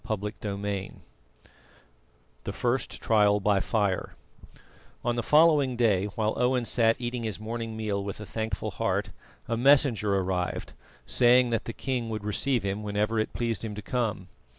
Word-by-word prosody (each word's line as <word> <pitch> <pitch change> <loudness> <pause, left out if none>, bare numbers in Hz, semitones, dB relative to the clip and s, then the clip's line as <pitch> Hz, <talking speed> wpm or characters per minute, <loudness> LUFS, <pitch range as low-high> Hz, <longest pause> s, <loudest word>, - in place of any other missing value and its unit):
CHAPTER 105 -1 -4
VIII 100 -1 -4 1.5
THE - - -2
FIRST 125 +1 -2
TRIAL 105 -2 +4
BY 100 0 +2
FIRE 100 -3 -1 0.9
On 120 0 +1
the 120 - 0
following 150 -1 +4
day, 105 -5 +2
while 110 -1 0
Owen 125 -1 +1
sat 115 -1 +3
eating 120 0 -3
his 110 -3 -3
morning 115 0 -5
meal 105 -2 -2
with 100 +1 -6
a 105 - -7
thankful 110 -1 -3
heart, - - -1 0.4
a 115 - 0
messenger 120 -5 +4
arrived 90 -1 -2 0.3
saying 125 0 +4
that 115 0 -1
the 115 - -5
king 125 -3 -3
would 110 -2 -4
receive 120 +3 0
him 100 +1 -2
whenever 105 +2 -1
it 110 - -1
pleased 115 -2 -2
him 105 -2 -4
to 105 - -6
come. 110 -5 -2
110 Hz, 155 wpm, -27 LUFS, 105-120 Hz, 1.5 s, TRIAL